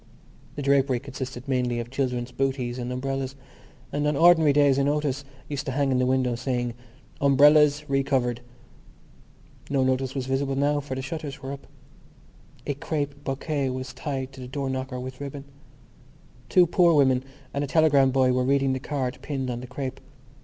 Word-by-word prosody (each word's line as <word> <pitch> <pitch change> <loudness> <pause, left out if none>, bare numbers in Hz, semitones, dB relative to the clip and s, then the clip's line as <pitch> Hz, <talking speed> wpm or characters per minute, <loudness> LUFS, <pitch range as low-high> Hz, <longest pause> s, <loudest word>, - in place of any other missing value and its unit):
The 145 - -4
drapery 135 -2 +3
consisted 130 -1 -7
mainly 125 -2 0
of 120 +1 -6
children's 125 -2 -2
bootees 130 -2 -2
and 125 0 -4
umbrellas; 135 +1 -3 0.6
and 145 +1 0
on 150 - +1
ordinary 165 -2 +6
days 140 -1 +4
a - - +3
notice 145 -1 0 0.2
used 145 0 -4
to - - 0
hang 140 0 +1
in 130 - +2
the 125 - +2
window, 130 -1 +1
saying: 120 -1 -2 0.5
Umbrellas 145 +1 +5
Re 135 -1 +2
covered. 125 -3 0 1.3
No 135 -2 +2
notice 130 0 0
was 130 -2 -2
visible 135 +1 -1
now 145 +2 +2
for 140 -2 -5
the 130 - -4
shutters 140 -1 -6
were 135 - -4
up. 140 0 -9 1.0
A 145 - -1
crape 145 0 -4
bouquet 140 0 -2
was 130 0 -5
tied 135 -2 -4
to 130 - -10
the 125 - -7
door 135 0 -3
knocker 130 -1 -4
with 130 +1 -7
ribbon. 140 0 -6 1.0
Two 180 +8 +6
poor 170 -1 +4
women 130 -3 +4 0.3
and 140 - -1
a - - -2
telegram 145 -3 +4
boy 130 -1 +3
were 125 0 +1
reading 135 0 +2
the 130 - -2
card 130 -2 -3
pinned 135 -3 -3
on 120 0 -4
the 125 - -8
crape. 130 +1 -5
135 Hz, 180 wpm, -25 LUFS, 130-145 Hz, 1.3 s, ordinary